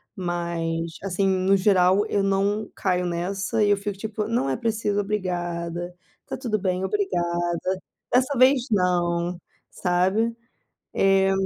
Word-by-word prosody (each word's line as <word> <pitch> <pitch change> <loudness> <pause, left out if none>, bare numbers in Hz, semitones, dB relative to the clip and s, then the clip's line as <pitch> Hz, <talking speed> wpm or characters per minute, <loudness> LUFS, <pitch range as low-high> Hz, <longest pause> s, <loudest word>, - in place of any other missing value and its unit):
Mas 170 -2 -3
assim, 195 0 0
no 190 +1 +3
geral 190 +1 +4
eu 205 - +1
não 200 +2 0
caio 180 -2 0
nessa 195 +5 -1
e 205 - +3
eu 200 - +4
fico 200 -1 -4
tipo, 215 0 -3
não 230 - 0
é 130 - 0
preciso 215 -2 -1
obrigada, 175 -3 -3 0.3
tá - - -4
tudo 225 -5 -1
bem, 185 0 -1
obrigada, 175 -4 0 0.7
dessa 260 +1 +2
vez 255 0 +5
não, 175 -2 +1 0.3
sabe. 190 +6 +1 0.6
Eh, 195 0 +3
190 Hz, 130 wpm, -24 LUFS, 175-210 Hz, 0.7 s, vez